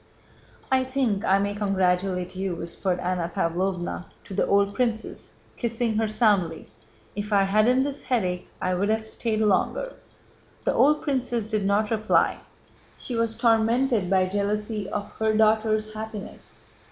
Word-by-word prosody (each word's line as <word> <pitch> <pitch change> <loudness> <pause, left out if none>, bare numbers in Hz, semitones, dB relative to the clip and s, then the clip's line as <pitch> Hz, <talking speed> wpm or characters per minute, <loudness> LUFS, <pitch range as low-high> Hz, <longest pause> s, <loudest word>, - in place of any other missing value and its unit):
"I 260 0 +4
think 255 -6 0
I 195 - +4
may 200 +1 -1
congratulate 185 -2 0
you," 190 -1 -2
whispered 175 +2 -2
Anna 175 -1 -2
Pávlovna 180 +1 -1 0.2
to - - -10
the - - +1
old 200 0 +3
princess, 230 -1 -2 0.2
kissing 230 -2 -1
her 220 0 +1
soundly. 205 - +1 0.4
"If 205 +1 -4
I 200 -1 +4
hadn't 215 +6 +3
this 280 0 -5
headache 185 -8 -1
I'd 185 +3 0
have 220 0 0
stayed 220 0 -2
longer." 215 - +1 0.7
The - - +1
old 300 +2 +3
princess 245 -6 -1
did 210 -2 0
not 210 +2 +1
reply, 220 -1 +2 0.6
she 245 - -4
was 230 -1 0
tormented 230 -2 +2
by 190 -1 +3
jealousy 205 +2 -2
of 205 -1 -4
her 220 -1 +2
daughter's 215 0 +2
happiness. 215 -1 -8
210 Hz, 140 wpm, -25 LUFS, 195-225 Hz, 0.7 s, I